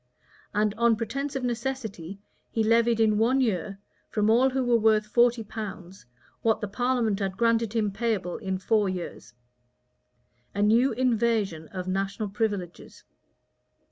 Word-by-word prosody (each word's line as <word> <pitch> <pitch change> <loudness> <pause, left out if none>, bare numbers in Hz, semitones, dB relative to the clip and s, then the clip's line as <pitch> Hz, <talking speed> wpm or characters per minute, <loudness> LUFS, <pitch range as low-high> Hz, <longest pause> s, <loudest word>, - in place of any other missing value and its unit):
And 210 0 +1
on 235 -1 +4
pretence 275 +6 -4
of 265 - -2
necessity, 230 -7 -4 0.3
he 225 - 0
levied 230 +1 +3
in 215 -1 +3
one 250 +4 +3
year, 200 -5 -1 0.3
from 210 0 +1
all 250 +4 +4
who 265 0 -1
were 240 -1 +3
worth 215 -1 +3
forty 235 +2 +3
pounds, 195 - -8 0.3
what 225 -1 +2
the 210 - -3
parliament 235 -1 0
had 195 -1 -3
granted 230 -1 +2
him 215 -3 0
payable 200 -4 -2
in 190 -3 -3
four 205 +1 +1
years;[] 175 -9 -7 1.2
a 205 - +1
new 230 +6 +4
invasion 225 -9 0
of 185 +1 -6
national 195 +3 -2
privileges. 200 -4 -4
220 Hz, 140 wpm, -26 LUFS, 195-235 Hz, 1.2 s, on